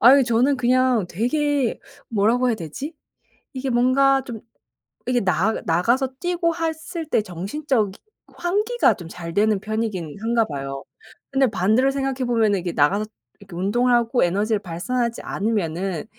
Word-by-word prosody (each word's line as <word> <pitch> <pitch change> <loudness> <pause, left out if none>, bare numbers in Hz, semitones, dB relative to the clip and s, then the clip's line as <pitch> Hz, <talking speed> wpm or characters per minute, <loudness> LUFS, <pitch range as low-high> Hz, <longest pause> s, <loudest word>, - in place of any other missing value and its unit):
아유 265 +4 +7
저는 245 +4 +2
그냥 250 -4 +2
되게 275 - 0 0.3
뭐라고 230 +4 +2
해야 240 - +2
되지? 220 - -7 0.6
이게 265 0 -3
뭔가 265 +3 +3
좀 230 -4 -7 0.7
이게 245 -1 +2
나 190 +3 +1
나가서 235 +11 +2
뛰고 350 -1 0 0.4
했을 330 -3 -4
때 - - +2
정신적인 210 - -2 0.4
환기가 420 +7 +1
좀 175 -4 -10
잘 170 -1 -7
되는 210 0 +3
편이기는 210 -7 -3
한가 230 +1 +2
봐요. 135 -2 -5 0.5
근데 270 -1 +3
반대로 220 +6 +2
생각해 270 -1 -2
보면은 220 -4 +2
이게 175 -1 -3
나가서 195 +9 +2 0.3
이렇게 195 -3 -13
운동을 240 +7 +2
하고 240 -1 +2
에너지를 205 +5 +1
발산하지 230 +7 -2
않으면은 190 -5 -2
230 Hz, 320 characters per minute, -22 LUFS, 195-260 Hz, 0.7 s, 아유